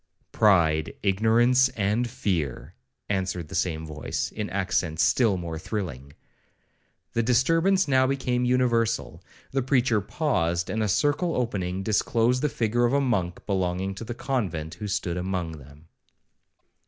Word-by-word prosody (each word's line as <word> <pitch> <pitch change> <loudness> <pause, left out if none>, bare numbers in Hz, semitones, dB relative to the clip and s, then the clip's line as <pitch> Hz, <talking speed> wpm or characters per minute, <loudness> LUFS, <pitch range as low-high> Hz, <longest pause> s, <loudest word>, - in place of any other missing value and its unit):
'—'Pride, 80 -7 +3
ignorance, 115 +6 +4
and 105 +4 0
fear,' 85 - -2 0.3
answered 95 -5 -2
the - - -10
same 80 -3 -1
voice, 75 -1 -4
in 105 -1 -4
accents 90 -4 0
still 110 -7 +3
more 85 -2 -5
thrilling. 75 - -5 1.0
The 115 - +2
disturbance 165 - +3
now 130 -1 +3
became 130 -2 0
universal. 120 -2 +1 0.3
The 135 - 0
preacher 125 -4 +2
paused, 90 - -1
and 110 - -1
a 110 - +1
circle 145 - +1
opening, 95 -6 -2
disclosed 115 +4 +1
the 150 - +1
figure 120 0 +1
of 120 - +1
a 140 - +4
monk 100 -10 -1
belonging 95 -1 -1
to 95 - -8
the 120 +1 -6
convent, 95 - -2
who 105 - -6
stood 90 -3 -2
among 90 -3 -3
them. 70 +3 -16
105 Hz, 140 wpm, -26 LUFS, 90-125 Hz, 1.0 s, ignorance